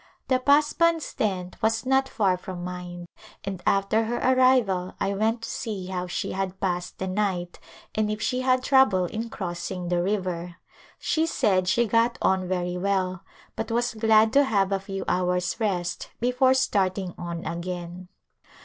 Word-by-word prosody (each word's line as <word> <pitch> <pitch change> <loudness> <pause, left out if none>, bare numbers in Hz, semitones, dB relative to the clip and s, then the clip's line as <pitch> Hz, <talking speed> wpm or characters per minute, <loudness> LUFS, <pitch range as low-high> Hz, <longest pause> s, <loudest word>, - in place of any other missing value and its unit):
The 255 -1 +3
Pasband's 300 +4 +3
tent 185 -4 -2
was 225 +2 +1
not 265 +1 +2
far 195 -5 +2
from 180 -1 -7
mine 180 -1 -6 0.4
and 195 -3 -5
after 200 +3 +2
her 240 +2 -2
arrival 255 -8 +3
I 200 - 0
went 225 +3 0
to - - -5
see 210 -7 -4
how 180 -1 -3
she 180 - -3
had 190 0 -3
passed 180 -2 -2
the 190 - -3
night 185 -2 -2 0.3
and 215 -1 0
if 215 0 -2
she 250 +3 -1
had 255 0 +2
trouble 260 -10 +4
in 225 +6 -4
crossing 175 -2 -4
the 175 -1 +1
river. 180 -3 -2 0.4
She 320 0 0
said 195 - +1
she 235 +6 +3
got 230 +3 +2
on 190 -1 +1
very 180 -1 -1
well 185 -2 -1 0.3
but - - -4
was 240 +1 0
glad 220 0 +4
to 285 +1 +6
have 200 -7 +1
a 195 - +1
few 195 0 -5
hours 180 +2 0
rest 185 -6 -2
before 250 +2 +3
starting 190 -7 0
on 170 -1 -6
again. 175 +1 -5
195 Hz, 165 wpm, -25 LUFS, 180-230 Hz, 0.4 s, to